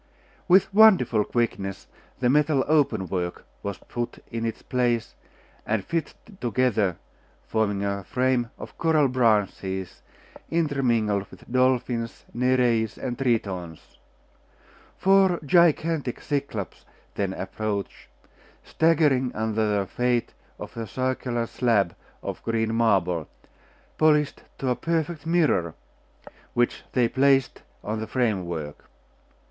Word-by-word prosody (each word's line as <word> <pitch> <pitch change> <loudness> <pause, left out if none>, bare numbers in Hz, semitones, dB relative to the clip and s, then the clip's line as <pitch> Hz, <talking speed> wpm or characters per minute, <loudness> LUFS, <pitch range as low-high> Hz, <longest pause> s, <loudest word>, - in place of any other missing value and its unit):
With 190 +2 +4
wonderful 180 - +6
quickness 100 -5 -2 0.4
the 125 - +3
metal 145 +1 +3
open 140 -11 +2
work 90 0 -3 0.2
was 100 -2 -4
put 120 0 -5
in 115 -1 -2
its 115 - -5
place, 120 -3 0 0.5
and 110 -3 -1
fitted 170 +4 -5
together, 115 -7 +1 0.5
forming 105 -3 0
a 100 0 -2
frame 125 +2 0
of - - -10
coral 160 -4 +3
branches 105 -6 0 0.5
intermingled 120 -11 +1
with - - -14
dolphins, 125 -2 0
Nereids, 120 -3 +1
and 125 -2 -3
Tritons. 100 - -3 1.0
Four 190 -2 +4
gigantic 160 -3 +2
Cyclops 140 -9 -4 0.3
then 100 -2 -2
approached, 100 +1 -4 0.6
staggering 150 -6 +2
under 110 0 0 0.2
the - - -19
weight 125 -1 +1 0.2
of - - -9
a 115 -1 -4
circular 130 0 -2
slab 110 -7 +1 0.3
of - - -5
green 115 -1 -1
marble, 95 -8 +1 0.7
polished 150 -2 +3 0.2
to 130 - -2
a - - +1
perfect 165 0 -2
mirror, 155 - +2 0.8
which 120 0 0
they 125 -2 +3
placed 135 +1 +2 0.2
on 110 +1 -3
the 110 - -4
framework. 90 - -2
120 Hz, 110 wpm, -25 LUFS, 105-140 Hz, 1.0 s, wonderful